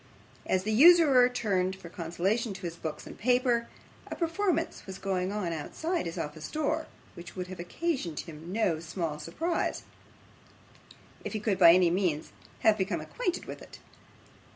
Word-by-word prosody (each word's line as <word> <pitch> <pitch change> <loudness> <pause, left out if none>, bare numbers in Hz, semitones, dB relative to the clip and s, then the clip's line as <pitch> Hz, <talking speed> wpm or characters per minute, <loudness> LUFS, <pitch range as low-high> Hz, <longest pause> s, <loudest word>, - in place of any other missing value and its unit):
As 185 0 +1
the 215 - -1
usurer 280 -1 +7
turned 190 -6 0
for 190 -2 -11
consolation 185 +6 -1
to 195 - -9
his 170 -1 -4
books 160 -3 -6
and - - -9
papers, 245 0 +2 0.4
a - - -4
performance 335 - -1
was 190 0 -6
going 190 -1 -1
on 195 -5 -2
outside 320 - -3
his 165 - -6
office 150 +1 -5
door, 310 +1 -1 0.3
which 170 0 -11
would 180 -1 -3
have 185 - -8
occasioned 180 - -2
him 165 +1 -10
no 190 -6 +1
small 160 -2 -4
surprise, 330 - -2 1.4
if - - -5
he 215 - -1
could 205 -3 0
by 170 -2 +9
any 180 -1 +4
means 175 -5 0 0.3
have 215 -1 +4
become 190 +2 0
acquainted 370 -8 -3
with - - -8
it. - - -12
190 Hz, 160 wpm, -29 LUFS, 170-250 Hz, 1.4 s, by